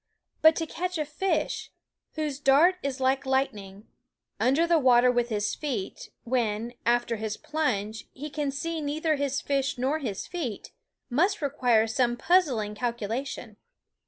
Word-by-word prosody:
But 315 0 +7
to 325 - -1
catch 360 +3 -3
a 305 - -1
fish 335 +7 -1 0.5
whose 300 -3 -2
dart 295 +7 +5
is 275 -1 -3
like 265 +1 +2
lightning 215 -7 -2 0.5
under 265 +9 +3
the 340 -1 +3
water 250 -2 +5
with 240 -1 0
his 210 -2 -1
feet, 250 -11 -4
when, 235 -2 -1
after 240 -1 +2
his 215 0 -4
plunge, 220 -9 -2
he 295 +3 -8
can 295 -1 -1
see 320 +4 -3
neither 310 +2 0
his 280 -1 -1
fish 280 -1 -1
nor 270 +5 0
his 215 -9 -4
feet, 280 - -5 0.4
must 365 +11 +2
require 250 -7 +2
some 240 +1 0
puzzling 260 - +2
calcula 235 +1 -2
tion. 225 -5 -8
265 Hz, 150 wpm, -27 LUFS, 230-305 Hz, 0.5 s, But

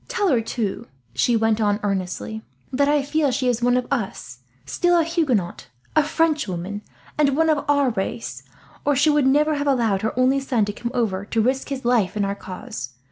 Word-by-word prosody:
"Tell 455 -6 0
her, 245 -5 +3
too," 225 -3 -3 0.3
she 230 - +2
went 225 0 +2
on 205 -1 +2
earnestly, 180 - -3 0.3
"that 280 +2 +2
I 295 -1 +3
feel 290 +1 +1
she 255 0 -1
is 240 -1 +1
one 245 +1 +3
of 250 - -1
us; 160 - -3 0.3
still 350 - +2
a 335 - +4
Huguenot, 285 - -1 0.3
a 310 - +6
Frenchwoman, 215 - -1 0.4
and 280 -2 +3
one 320 0 +4
of 295 -2 0
our 285 -3 +3
race, 220 +2 -4 0.4
or 290 - +2
she 295 +3 +4
would 295 -3 +3
never 300 +3 +3
have 285 -1 -2
allowed 230 -8 +2
her 220 +2 -2
only 260 +2 +3
son 250 -5 0
to 205 - -4
come 235 +3 -4
over, 200 -6 0
to 225 - -2
risk 260 +5 0
his 270 -3 -5
life 225 -5 +2
in 205 - +1
our 200 - -1
cause. 130 -11 -8
245 Hz, 200 wpm, -22 LUFS, 205-285 Hz, 0.4 s, a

